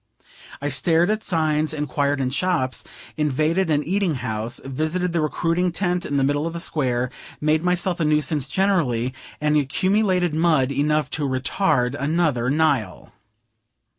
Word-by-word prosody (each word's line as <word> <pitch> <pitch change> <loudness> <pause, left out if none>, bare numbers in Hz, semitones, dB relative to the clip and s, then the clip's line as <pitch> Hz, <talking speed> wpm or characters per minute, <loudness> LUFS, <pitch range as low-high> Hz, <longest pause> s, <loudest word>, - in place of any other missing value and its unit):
I 145 - -2
stared 165 +7 +2
at 215 0 -1
signs, 155 -2 0
inquired 145 -1 -1
in 130 -1 -1
shops, 145 -5 0 0.3
invaded 155 +5 +1
an 150 -1 +2
eating 185 -1 0
house, 115 -2 -3
visited 155 +6 -1
the 170 - +1
recruiting 170 +3 0
tent 180 0 -1
in 145 - -1
the 135 - +2
middle 145 +3 +1
of 165 - -5
the 170 - -4
Square, 125 -6 -1 0.3
made 155 +1 +2
myself 180 0 0
a - - +1
nuisance 150 -2 0
generally, 145 -12 +1 0.3
and 150 0 +1
accumulated 185 +4 +1
mud 155 -5 +2
enough 145 0 0
to 150 -3 -2
retard 130 -1 +1
another 145 -4 0
Nile. 140 -10 0
155 Hz, 145 wpm, -22 LUFS, 135-175 Hz, 0.3 s, stared